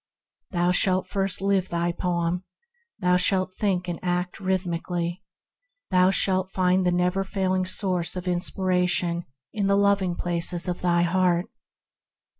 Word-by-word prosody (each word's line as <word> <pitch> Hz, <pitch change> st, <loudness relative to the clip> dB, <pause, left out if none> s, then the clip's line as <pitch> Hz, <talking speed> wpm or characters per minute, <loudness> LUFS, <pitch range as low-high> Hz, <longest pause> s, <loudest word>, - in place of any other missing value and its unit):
Thou 175 Hz, -1 st, +1 dB
shalt 185 Hz, +1 st, +2 dB
first 195 Hz, -1 st, -1 dB
live 195 Hz, -2 st, +1 dB
thy 170 Hz, 0 st, 0 dB
poem; 175 Hz, 0 st, -1 dB, 0.5 s
thou 180 Hz, -3 st, +2 dB
shalt 185 Hz, 0 st, +2 dB
think 185 Hz, -3 st, -1 dB
and 175 Hz, -1 st, -4 dB
act 180 Hz, 0 st, -2 dB
rhythmically; 175 Hz, -1 st, -2 dB, 0.7 s
thou 185 Hz, 0 st, +5 dB
shalt 190 Hz, -1 st, +2 dB
find 185 Hz, 0 st, +1 dB
the -, -, +3 dB
never 180 Hz, +2 st, +1 dB
failing 185 Hz, -1 st, -1 dB
source 185 Hz, -3 st, -1 dB
of 180 Hz, 0 st, -5 dB
inspiration 180 Hz, -1 st, 0 dB, 0.3 s
in 205 Hz, -2 st, -1 dB
the 200 Hz, 0 st, +3 dB
loving 200 Hz, -3 st, +2 dB
places 175 Hz, +1 st, -1 dB
of 180 Hz, -1 st, -3 dB
thy 175 Hz, -1 st, +2 dB
heart. 180 Hz, 0 st, +2 dB
180 Hz, 135 wpm, -25 LUFS, 175-190 Hz, 0.7 s, thou